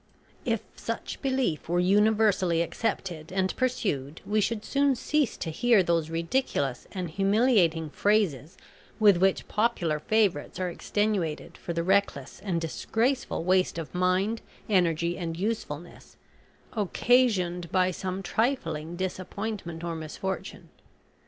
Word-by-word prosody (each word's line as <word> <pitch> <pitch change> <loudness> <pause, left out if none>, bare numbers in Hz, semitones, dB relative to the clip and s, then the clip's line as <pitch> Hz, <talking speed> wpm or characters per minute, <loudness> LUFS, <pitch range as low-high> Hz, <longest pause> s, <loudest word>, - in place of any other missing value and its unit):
If - - 0
such - - -5
belief 260 - -1
were 175 +1 +2
universally 200 -3 +3
accepted 170 -3 -3
and 190 0 0
pursued, 165 - -1
we 215 +1 +1
should 220 0 -1
soon 280 -1 +2
cease 290 +1 0
to 160 - -4
hear 230 +3 +4
those 165 -2 +1
ridiculous 165 - -1
and 185 -3 -3
humiliating 195 - +2
phrases 185 - +1 0.4
with 205 -4 +6
which 190 +1 +2
popular 195 -9 0
favourites 195 -4 +1
are 185 -1 -1
extenuated 195 -4 -1
for 170 - -5
the 170 0 -1
reckless 190 -7 0
and 180 -5 -1
disgraceful 225 - -1
waste 185 0 +2
of 165 -2 -6
mind, 185 +5 +1 0.3
energy, 170 -3 +1
and 165 -2 -3
usefulness, 175 -5 -5 0.6
occasioned 200 -5 +2
by 185 -1 +3
some 185 +2 -4
trifling 175 - -1
disappointment 185 -1 -4
or 170 -1 -3
misfortune. 165 +5 -5
185 Hz, 120 wpm, -27 LUFS, 165-215 Hz, 0.6 s, with